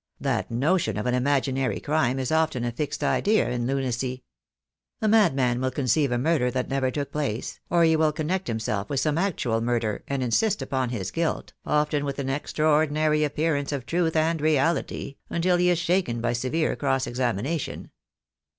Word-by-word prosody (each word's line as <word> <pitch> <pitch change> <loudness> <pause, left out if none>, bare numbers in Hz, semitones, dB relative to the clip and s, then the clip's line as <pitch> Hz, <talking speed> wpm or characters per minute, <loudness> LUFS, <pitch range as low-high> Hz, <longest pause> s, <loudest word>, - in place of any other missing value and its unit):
That - - -1
notion 130 - +1
of 105 - -3
an 125 - +1
imaginary 135 0 0
crime 145 -4 0
is 130 +1 -2
often 160 -6 +1
a 120 - -1
fixed 145 +5 -3
idea 215 +2 +2
in 120 -1 -1
lunacy. 130 -1 -2 0.8
A 215 - 0
madman 135 - +3
will 130 - +1
conceive 135 +1 +1
a 120 - +1
murder 140 -1 +2
that 125 0 -2
never 135 -1 +1
took 140 +2 -4
place, 135 -6 -3
or 170 0 +4
he 160 -1 +4
will 155 -1 +3
con 150 0 -4
nect 190 -1 -1
himself 110 -3 -2
with 140 - 0
some 155 +2 +1
actual 130 - 0
murder, 115 -3 -1
and 140 -2 -1
insist 150 - +1
upon 135 -2 -1
his 110 -6 -4
guilt, 165 -1 -2
often 150 -1 +1
with 140 -1 -3
an 135 -2 -3
extraordinary 150 +1 +1
appearance 150 -1 0
of 140 -4 -3
truth 165 0 0
and 160 0 +1
reality, 155 -1 0
until 175 +1 +2
he 180 0 +3
is 175 - +3
shaken 170 -7 0
by 120 +1 0
severe 130 +7 0
cross 135 -2 0
examina 125 - -1
tion." - - -7
140 Hz, 180 wpm, -25 LUFS, 125-160 Hz, 0.8 s, or